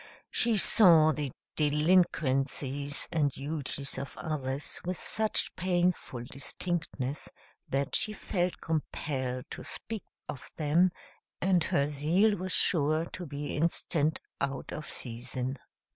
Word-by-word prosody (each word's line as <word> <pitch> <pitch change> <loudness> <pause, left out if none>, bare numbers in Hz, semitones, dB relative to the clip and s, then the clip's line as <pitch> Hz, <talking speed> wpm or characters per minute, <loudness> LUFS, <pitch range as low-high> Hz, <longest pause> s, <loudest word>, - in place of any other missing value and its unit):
She 230 -2 +3
saw 170 -7 +7
the 150 -3 -2 0.2
delinquencies 145 -3 +2
and 150 -3 +2
duties 140 -1 -3
of 140 - -7
others 140 -3 -2
with 180 0 -2
such 220 -1 +1
painful 175 -8 0
distinctness 145 0 -3 0.4
that 140 +1 0
she 215 - +3
felt 180 -3 -2
compelled 130 -5 -2
to - - -6
speak 225 -3 -5 0.3
of 130 - -7
them; 160 +4 +4 0.5
and 180 -3 +3
her 140 - +2
zeal 160 +9 +3
was 185 -1 -3
sure 155 -1 +3
to 180 -2 -6
be 145 +1 -4
instant 160 -1 +1 0.2
out 135 -1 -2
of 155 - -6
season. 125 +2 -3
150 Hz, 115 wpm, -30 LUFS, 140-175 Hz, 0.5 s, saw